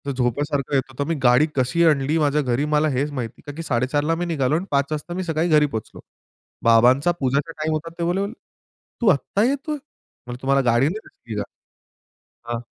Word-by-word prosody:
झोपासारखं 140 +3 -1
येत 135 - +4
होतं. 130 +2 -3
मी 165 - 0
गाडी 125 +4 +5
कशी 130 +6 +1
आणली 150 0 +2
माझ्या 150 -1 +2
घरी 130 +1 0
मला 150 0 +2
हेच 140 +2 -1
माहित 125 -5 -3
नाही. - - -22
का - - -4
की 165 - -5
4:30 130 +1 0
ला 165 +2 +1
मी 175 +1 -2
निघालो 150 -4 0
आणि 175 - -1
पाच 140 -1 +2
वाजता 155 +3 -4
मी 185 +1 -3
सकाळी 165 0 0
घरी 150 -1 +5
पोहोचलो. 110 -7 -6 0.6
बाबांचा 125 +8 +5
पूजेचा 140 +4 0
टाईम 155 0 -2
होता. 155 +2 -3
ते - - 0
बोलले, 180 +4 0 0.8
"तू 235 - +1
आता 190 +6 +1
येतोय?" 280 +4 0
म्हंटलं, 130 - -13
"तुम्हाला 135 +1 +2
गाडी 120 +5 +3
नाही 205 +7 -2
दिसली 110 -3 -10
का?" - - -2 1.1
हां. 120 - -1
145 Hz, 200 wpm, -22 LUFS, 130-165 Hz, 1.1 s, गाडी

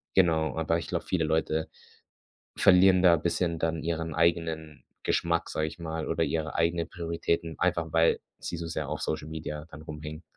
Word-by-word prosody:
Genau, 80 -4 +3
aber 80 +1 +1
ich 85 - -7
glaube, - - -2
viele 85 -4 0
Leute 80 0 0 0.9
verlieren 95 0 +6
da 85 -2 +7
bisschen 85 +1 -1
dann 80 -1 0
ihren 80 -1 -2
eigenen 80 -2 0 0.2
Geschmack, 85 0 +1
sage 80 0 -1
ich 80 - -11
mal 80 -1 -4
oder - - +1
ihre 80 -1 -2
eigenen 85 0 +1
Prioritäten, 85 -1 -2
einfach 85 -3 0
weil 80 0 +4 0.2
sie - - -5
so 85 - -4
sehr 80 -4 -3
auf 75 +1 -3
Social 75 -1 -2
Media 75 -1 -5
dann 75 0 -10
rumhängen. 75 +1 -7
80 Hz, 175 wpm, -28 LUFS, 80-85 Hz, 0.9 s, da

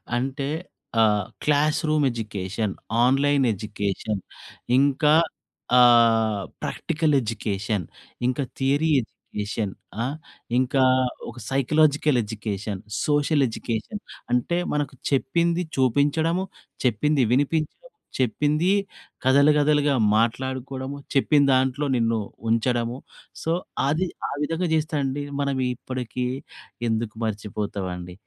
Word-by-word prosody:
అంటే 135 +3 -2 0.5
ఆహ్, 105 -3 +3 0.2
classroom 155 0 +2
education, 105 -2 -3 0.3
online 140 +2 +3
education, 105 -1 -3 0.6
ఇంకా 140 +2 +4 0.7
ఆహ్, 115 -3 +5 0.2
ప్రాక్టికల్ 155 -2 0
ఎడ్యుకేషన్, 105 -4 -2 0.4
ఇంక 125 +2 0 0.2
థియరీ 140 +4 +2
ఎడ్యుకేషన్, 105 -2 -5 0.3
ఆహ్, 135 +4 -2 0.4
ఇంకా 130 +1 +2 0.5
ఒక 120 - -11
సైకలాజికల్ 145 0 +3
ఎడ్యుకేషన్, 105 -2 -4 0.2
సోషల్ 145 0 +2
ఎడ్యుకేషన్, 115 - -4 0.3
అంటే 150 +8 +1 0.2
మనకు 145 -2 -1 0.2
చెప్పింది 170 +6 +1
చూపించడము, 145 +7 +2 0.4
చెప్పింది 130 +4 +2
వినిపించడం. 145 +3 +1 0.4
చెప్పింది 150 +7 +1 0.5
కథలు 140 +3 +5
కథలుగా 145 -1 +3 0.2
మాట్లాడుకోవడము. 130 +4 -2 0.2
చెప్పిందాంట్లో 140 -1 +3
నిన్ను 115 -1 +1 0.3
ఉంచడము. 120 +1 +1 0.5
సో, 165 - 0 0.4
అది 165 +6 +1 0.2
ఆ - - -5
విధంగా 165 +4 -1
చేస్తే 155 0 0
అండి 135 +2 -2 0.2
మనం 140 -1 0 0.2
ఇప్పటికి 125 0 -4 0.6
ఎందుకు 110 -1 -2
మర్చిపోతామండి. 100 -4 -4
130 Hz, 90 wpm, -24 LUFS, 110-145 Hz, 0.7 s, ఆహ్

